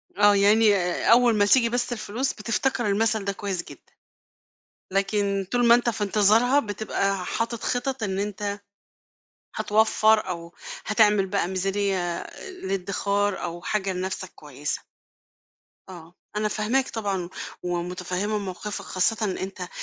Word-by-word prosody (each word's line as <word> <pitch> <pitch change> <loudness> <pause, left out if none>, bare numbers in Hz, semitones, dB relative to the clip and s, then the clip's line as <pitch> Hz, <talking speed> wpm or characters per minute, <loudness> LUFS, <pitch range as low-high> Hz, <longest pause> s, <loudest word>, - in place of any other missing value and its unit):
آه، 205 0 +5
يعني 205 +1 +5
آآ 180 -2 -1
أول 240 -1 +6
ما 205 -1 +4
تيجي 235 +2 +4
بس 245 +1 -1
الفلوس 235 +4 -2
بتفتكر 235 +3 -1
المَثَل 215 0 +1
ده 200 - -1
كويس 195 -4 -3
جدًا، - - -15 1.0
لكن 200 0 0
طول 245 -1 +3
ما 235 - +8
أنت 240 0 +2
في 210 -1 -2
انتظارها 215 +7 +4
بتبقى 200 -4 -2
حاطط 230 0 -2
خِطَط 250 0 -2
إن 195 -2 -1
أنت 205 0 -3 1.0
هتوفّر 220 0 +3
أو 170 -1 -6 0.3
هتعمل 210 -3 +4
بقى 195 -2 0
ميزانيّة 195 +1 0
آآ 175 - -5
للإدخار 200 - -1
أو 170 +1 -5
حاجة 195 -2 -1
لنَفسك 185 0 -4
كويسة. 145 -1 -4 1.1
آه، 175 -1 -11 0.2
أنا 215 0 +1
فاهماك 230 +6 0
طبعًا 195 -5 -2 0.3
ومتفهّمة 180 +4 -2
موقِفك 200 +1 -5
خاصةً 190 +4 +1
إن 190 - -3
أنت 185 -1 -5
205 Hz, 135 wpm, -25 LUFS, 190-220 Hz, 1.1 s, ما